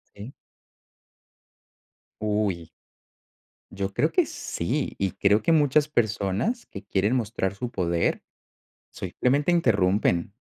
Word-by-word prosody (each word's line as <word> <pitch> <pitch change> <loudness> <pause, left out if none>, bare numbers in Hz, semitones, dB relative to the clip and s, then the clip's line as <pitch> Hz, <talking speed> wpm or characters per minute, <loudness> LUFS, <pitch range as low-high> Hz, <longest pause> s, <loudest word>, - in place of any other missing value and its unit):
Sí. 105 +7 -9 1.9
Uy. 105 -6 -1 1.0
Yo 95 0 -4
creo - - +1
que - - +3
sí. 130 - -3
Y 95 -1 0
creo 100 +2 +2
que 165 - +1
muchas 150 -1 +3
personas 110 - -1
que 100 - -9
quieren 105 +6 0
mostrar 105 -5 -1
su 125 +3 -5
poder, 85 -4 0 0.7
simplemente 145 +6 0
interrumpen. 100 - +2
105 Hz, 105 wpm, -25 LUFS, 95-130 Hz, 1.9 s, que